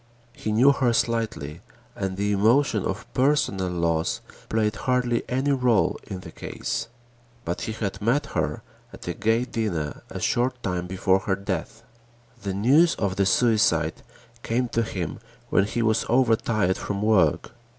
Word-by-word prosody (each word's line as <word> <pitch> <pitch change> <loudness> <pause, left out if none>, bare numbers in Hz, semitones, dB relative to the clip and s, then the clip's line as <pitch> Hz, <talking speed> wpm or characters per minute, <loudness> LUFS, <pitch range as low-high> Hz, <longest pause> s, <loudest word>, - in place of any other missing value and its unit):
He 110 - -4
knew 125 +6 +6
her 130 -4 +1
slightly 110 -11 -1 0.3
and 95 -1 -3
the 100 +1 0
emotion 110 +1 +3
of 95 +1 -3
personal 130 -9 +1
loss 85 -2 0 0.3
played 110 -1 +1
hardly 125 +2 +1
any 130 +3 +1
rôle 125 -6 +2
in 95 -2 -6
the - - -10
case. - - -4 0.6
But - - -3
he 110 - -3
had 105 -3 -4
met 120 +8 +2
her 115 - -1 0.3
at - - -11
a 85 - -1
gay 115 +7 +1
dinner 95 -12 -3
a - - -6
short 125 +1 0
time 90 -2 -2
before 95 +1 +2
her 95 0 -1
death. 100 +3 -4 0.6
The 100 -1 -3
news 140 - +4
of 100 -3 -1
the 100 -1 +2
suicide 95 -8 +2 0.4
came 120 +2 -1
to 115 0 +1
him 95 -7 -4 0.3
when 95 - +4
he 115 +3 -1
was 110 0 +1
overtired 115 -6 +2
from 100 0 -3
work. 100 -8 +3
110 Hz, 155 wpm, -25 LUFS, 95-120 Hz, 0.6 s, knew